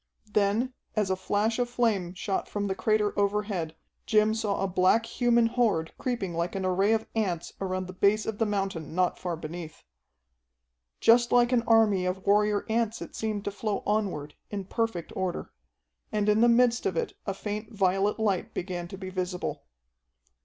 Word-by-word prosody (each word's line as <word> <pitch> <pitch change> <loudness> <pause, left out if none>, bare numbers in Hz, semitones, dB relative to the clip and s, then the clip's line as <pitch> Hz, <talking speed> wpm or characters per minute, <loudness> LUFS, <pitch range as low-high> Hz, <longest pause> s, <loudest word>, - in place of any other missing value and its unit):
Then, 210 +5 +2 0.2
as 210 -3 +1
a - - +2
flash 205 +5 0
of 245 -1 0
flame 210 -7 0
shot 190 +1 -2
from 205 -1 -2
the 195 - 0
crater 210 +2 +1
overhead, 200 -5 -1 0.3
Jim 215 -1 +4
saw 215 -3 -1
a - - +1
black 185 +5 +3
human 235 -1 +2
horde 225 -9 +1
creeping 235 -8 -2
like 170 +2 -2
an 190 -1 -2
array 190 +4 +3
of 220 0 0
ants 185 -7 -1
around 185 -1 -2
the 185 - -8
base 205 +3 +2
of 220 -2 -4
the 225 - +2
mountain 195 -7 -2
not 180 -1 +1
far 175 -2 -2
beneath. 160 0 -8 1.2
Just 235 +1 +5
like 240 0 +4
an 245 -2 +4
army 215 -5 +4
of 185 +1 -3
warrior 210 0 +3
ants 225 0 0
it - - -8
seemed 215 -2 -3
to 205 - -1
flow 205 0 -3
onward, 190 -9 -1 0.2
in 200 -2 -4
perfect 225 -5 -2
order. 185 -2 -3 0.6
And 210 -1 0
in 210 +1 +4
the 240 - +6
midst 240 - +3
of 395 - -2
it 475 -1 -1
a - - -1
faint 210 +2 -5
violet 195 0 +1
light 200 -5 0
began 175 -1 -4
to 190 - -8
be 185 0 -7
visible. 180 - -3
205 Hz, 180 wpm, -28 LUFS, 185-225 Hz, 1.2 s, the